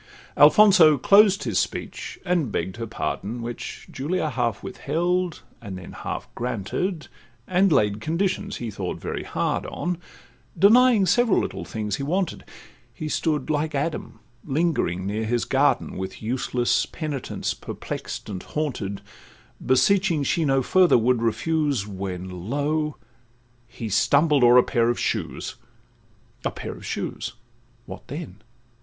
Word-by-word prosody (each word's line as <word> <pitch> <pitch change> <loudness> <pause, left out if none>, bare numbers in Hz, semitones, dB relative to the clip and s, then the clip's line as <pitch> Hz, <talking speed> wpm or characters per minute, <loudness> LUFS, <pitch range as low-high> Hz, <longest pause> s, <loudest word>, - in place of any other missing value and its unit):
Alfonso 160 0 +7
closed 200 - +5
his - - 0
speech, - - -4
and 175 - +1
begg'd 95 0 -3
her 115 -1 -4
pardon, 115 +3 -4
Which 120 0 -6
Julia 155 +3 -2
half 120 -5 -1
withheld, 175 +2 -1 0.2
and 100 -5 -7
then 90 - -10
half - - -5
granted, 125 - -3 0.4
And 185 +1 +3
laid 105 -7 +2
conditions 180 - -1
he 115 -2 -5
thought 95 -3 -4
very - - -4
hard - - -2
on, 175 -1 -3 0.6
Denying 220 +3 +6
several 240 +3 +3
little - - -4
things 105 -3 -3
he - - -5
wanted: 180 +6 -1 0.5
He 155 +6 -6
stood 150 -2 0
like 150 0 -1
Adam 140 -6 -3 0.3
lingering 140 - 0
near 105 +3 -2
his 120 +2 0
garden, 140 +2 +1
With 95 0 -5
useless 120 +1 0
penitence 150 -5 -4
perplex'd - - -6
and 95 -4 -5
haunted, 115 -10 -3 0.6
Beseeching 170 +4 +3
she 160 +4 +1
no 135 -2 +2
further 185 +3 +5
would 120 +1 +2
refuse, 135 +1 0
When, 95 -1 -6
lo! 150 +2 0 0.7
he 115 -1 -7
stumbled 140 - +3
o'er 120 +1 +7
a 125 - +7
pair 120 -3 +1
of 120 - 0
shoes. - - -3 0.9
A - - +1
pair - - -6
of - - -12
shoes!—what 120 0 -7
then? 145 - -7
135 Hz, 135 wpm, -24 LUFS, 115-165 Hz, 0.9 s, Alfonso